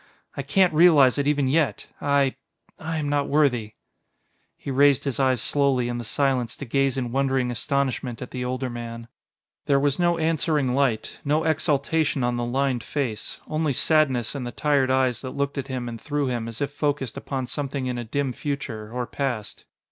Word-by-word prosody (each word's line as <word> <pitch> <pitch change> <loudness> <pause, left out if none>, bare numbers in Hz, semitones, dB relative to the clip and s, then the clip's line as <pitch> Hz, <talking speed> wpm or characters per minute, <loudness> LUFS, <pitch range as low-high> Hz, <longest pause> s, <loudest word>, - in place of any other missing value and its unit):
I - - -2
can't 190 -4 +3
realize 150 -5 +6
it 140 - 0
even 145 -2 +2
yet. 150 +2 +1 0.2
I 140 -2 +2 0.5
I 160 0 -3
am 150 -2 -2
not 145 -1 +1
worthy...." 125 -8 +1 0.8
He 140 - -6
raised 140 0 +4
his 140 -1 -2
eyes 130 -2 +2
slowly 135 -4 +2
in 120 0 -3
the - - -4
silence 130 0 0
to 140 - -6
gaze 135 +1 +1
in 125 -2 -2
wondering 135 -1 +1
astonishment 130 -1 -1
at 125 - -7
the 125 -1 -4
older 130 +1 -2
man. 115 -1 -7 0.6
There 140 -1 +4
was 145 +1 +1
no 175 -1 +3
answering 155 -4 +1
light, 125 -5 0
no 150 +2 +1
exaltation 155 -2 +1
on 120 0 +1
the 120 0 -1
lined 130 -1 0
face. 120 -3 -4
Only 155 -2 0
sadness 130 -5 +2
in 140 -3 -4
the 120 - -4
tired 140 -1 +1
eyes 130 -2 +2
that 130 +1 -7
looked 140 0 -1
at 135 - -5
him 130 -3 -4
and 115 -2 -7
through 145 -2 -1
him 120 -2 -2
as 115 +2 -7
if 140 0 -1
focused 145 -4 -2
upon 135 -2 -4
something 140 0 -3
in 125 -1 -2
a - - -3
dim 135 +3 -2
future 130 -7 -5
or 125 0 -2
past. 125 -5 -4
135 Hz, 190 wpm, -24 LUFS, 125-145 Hz, 0.8 s, realize